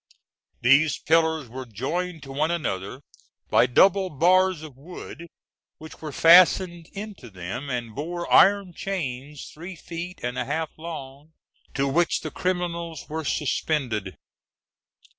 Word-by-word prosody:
These 135 +5 +4
pillars 160 -3 +2
were 130 +2 -8
joined 160 - -3
to 135 - -9
one 150 +4 0
another 130 - -3 0.5
by 125 - +5
double 190 +8 +4
bars 180 +2 +3
of 150 -5 -10
wood, 170 +3 -10 0.5
which 160 0 -12
were 155 -2 -5
fastened 175 +1 +5
into 200 - -8
them, 100 +9 -6
and 120 -3 -4
bore 170 +6 -4
iron 200 -2 +5
chains 145 -7 -5
three 175 +4 -8
feet 170 +2 -7
and 125 +1 -2
a 125 - -1
half 155 +4 -2
long, 155 -2 -9 0.4
to 140 0 +1
which 165 +5 +1
the 155 - -5
criminals 170 -3 -3
were 160 +1 -3
suspended. 130 - -1
155 Hz, 130 wpm, -25 LUFS, 135-175 Hz, 0.5 s, by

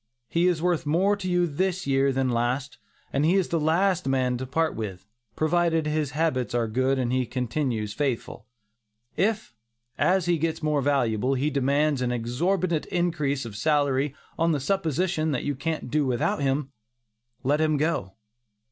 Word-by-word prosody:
He 170 +2 +2
is 170 -3 +1
worth 175 -3 +1
more 190 +7 +3
to 190 -2 -4
you 175 0 +3
this 185 +4 -1
year 135 0 +2
than 130 0 0
last, 125 +3 -1 0.3
and 140 - +1
he 165 +5 +3
is 190 -3 +1
the 165 - +1
last 175 +2 +2
man 130 -2 +1
to 130 - -4
part 160 +4 0
with, 95 -4 -5 0.3
provided 165 0 +1
his 150 -1 0
habits 130 -8 0
are 120 -1 +1
good 130 +4 +1
and 125 -1 0
he 130 -1 +1
continues 120 -3 -2
faithful. 125 -4 -3 0.7
If, 215 - 0 0.5
as 185 -1 +3
he 175 -2 +1
gets 160 0 -2
more 150 -2 +1
valuable, 130 -2 +1
he 145 +4 0
demands 140 +1 +1
an 125 -1 0
exorbitant 160 +9 0
increase 150 -7 -1
of 110 -3 -8
salary 140 +1 +1 0.2
on 165 0 +3
the 145 - 0
supposition 160 0 0
that 125 - -2
you 145 - -1
can't 150 -1 -4
do 150 -2 +1
without 125 +3 0
him, 135 0 0 0.7
let 145 +4 +2
him 155 -1 +2
go. 140 - -1
145 Hz, 170 wpm, -26 LUFS, 130-165 Hz, 0.7 s, more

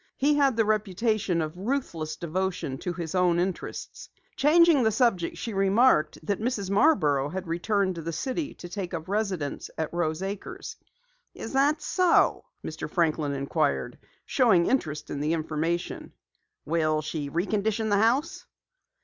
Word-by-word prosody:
He 290 +2 +3
had 275 -5 +3
the 225 - +3
reputation 215 -3 0
of 155 +1 -6
ruthless 180 - -3
devotion 175 -5 -3
to 180 - -3
his 170 -3 -5
own 180 -2 +3
interests. 185 0 -4 0.3
Changing 325 0 +5
the 220 - +4
subject, 210 -7 +1
she 230 - -5
remarked 195 -3 +3
that 200 +2 -1
Mrs. 220 -5 -2
Marborough 155 - +3
had 190 +3 -5
returned 190 +3 0
to 170 - -6
the 165 +1 -4
city 265 - -3
to 175 - -9
take 180 -1 -5
up 160 -1 -6
residence 195 -7 -2
at 160 0 -3
Rose 170 0 -1
Acres. 195 +1 -6 0.6
"Is - - -7
that 285 +3 +2
so?" 365 -2 +3 0.2
Mr. - - -5
Franklin 155 -4 0
inquired, 140 0 -1 0.3
showing 215 -10 +3
interest 155 - -1
in 140 - -3
the 150 +3 0
information. 165 +2 -3 0.5
"Will 155 -1 +1
she 150 -2 -4
recondition 210 +6 -1
the 200 - +4
house?" 300 - +1
190 Hz, 150 wpm, -27 LUFS, 160-230 Hz, 0.6 s, Changing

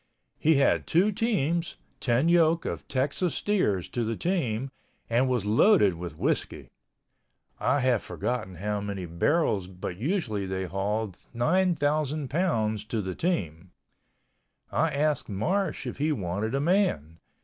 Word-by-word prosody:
He 160 +1 +4
had 140 0 +2
two 190 +6 +3
teams 175 - 0 0.2
(10 125 +5 +2
yoke 170 -1 +4
of - - -4
Texas 140 +6 -1
steers 105 - 0
to 120 - -2
the 115 0 -1
team) 135 - -1 0.4
and 125 +3 +3
was 125 -5 0
loaded 110 - +5
with 85 -2 -7
whiskey—I 140 - -4
have 125 -4 +2
forgotten 120 -7 -3
how 105 +3 -2
many 100 -2 -4
barrels 95 - +1
but 90 -1 -7
they - - -7
usually 105 - -1
hauled 100 +1 -2 0.2
9,000 155 -1 +1
pounds 110 - 0
to 110 +1 -2
the 95 0 -3
team. 90 - -2 1.0
I - - +2
asked 150 -2 0
Marsh 170 - -1
if - - -5
he 150 +2 +1
wanted 105 - -2
a - - +1
man. 145 - +1
125 Hz, 135 wpm, -27 LUFS, 100-165 Hz, 1.0 s, loaded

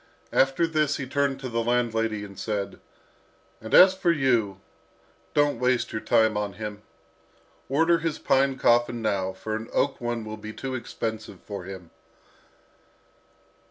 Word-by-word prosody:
After 135 +5 +3
this 155 -2 0
he 135 - -4
turned 140 0 0
to 130 - -4
the 115 -1 -1
landlady, 115 -3 0
and 100 -1 -12
said, 105 -3 -3 0.8
"And 110 - -8
as 185 +1 +9
for 185 -2 +1
you, 120 - +1 0.8
don't 145 -4 +2
waste 125 0 +1
your 110 - -3
time 110 -1 +3
on 105 -1 -2
him. 105 +1 -7 0.9
Order 165 +5 +3
his 165 -2 -2
pine 135 0 +2
coffin 120 -1 +2
now, 95 -3 0
for 110 +3 -5
an 110 +1 -6
oak 140 -2 0
one 120 -2 -3
will 110 0 -6
be 110 0 -8
too 135 +2 -5
expensive 110 -3 -5
for 100 -4 -7
him." 95 -3 -9
120 Hz, 150 wpm, -26 LUFS, 110-135 Hz, 0.9 s, as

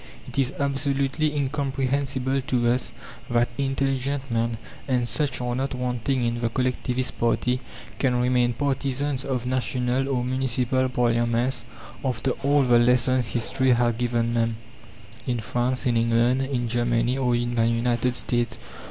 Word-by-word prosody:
It - - -4
is 135 -1 +2
absolutely 140 +2 0
incomprehensible 135 -1 -1
to 120 -4 +2
us 125 +1 -1 0.4
that 120 0 +2
intelligent 135 0 -1
men 115 0 0 0.3
and 125 -3 +1
such 135 -1 -1
are 125 0 -1
not 135 +1 -2
wanting 125 +1 -1
in 120 0 -1
the 115 - +1
collectivist 125 +1 -1
party 125 +2 +1 0.4
can 125 -3 +2
remain 125 -1 +2
partisans 140 +1 -1
of 130 -3 -2
national 130 +1 0
or 125 -3 0
municipal 130 0 0
parliaments 120 0 +1 0.4
after 130 -1 0
all 140 +1 +3
the 120 -2 +5
lessons 125 0 +3
history 130 +2 +1
has 120 -1 +2
given 120 0 0
them 115 -1 +1 0.7
in 120 -2 0
France, 125 +3 -1
in 120 -2 +2
England, 115 +3 +3
in 130 -3 -1
Germany, 120 +1 +1
or 125 -2 +2
in 120 0 -1
the 115 -1 +2
United 120 +1 +1
States. 120 -2 0
125 Hz, 145 wpm, -25 LUFS, 120-135 Hz, 0.7 s, the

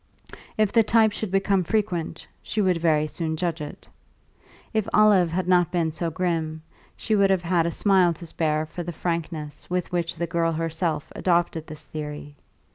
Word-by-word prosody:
If 215 -2 +2
the 230 - +6
type 220 0 +4
should 210 0 -4
become 195 0 +2
frequent, 185 -4 -2 0.2
she 215 - -4
would 185 -4 +3
very 155 -2 +2
soon 160 +1 -3
judge 170 -2 -2
it. 150 - -8 0.9
If 220 -2 0
Olive 205 -5 +5
had 180 +2 -2
not 180 -2 +3
been 170 -3 0
so 165 +2 -2
grim, 160 -2 -2 0.3
she 220 - -2
would 200 -1 +4
have 190 -2 +2
had 170 -1 +2
a - - -1
smile 190 -2 +3
to 170 - -10
spare 155 -1 -1
for 165 +3 -7
the 175 0 -5
frankness 160 -3 -4
with 180 0 -2
which 170 -1 -1
the 170 +1 -2
girl 165 0 0
herself 165 -1 -2
adopted 170 -3 0
this 155 -1 -9
theory. 150 0 -7
170 Hz, 180 wpm, -25 LUFS, 160-185 Hz, 0.9 s, the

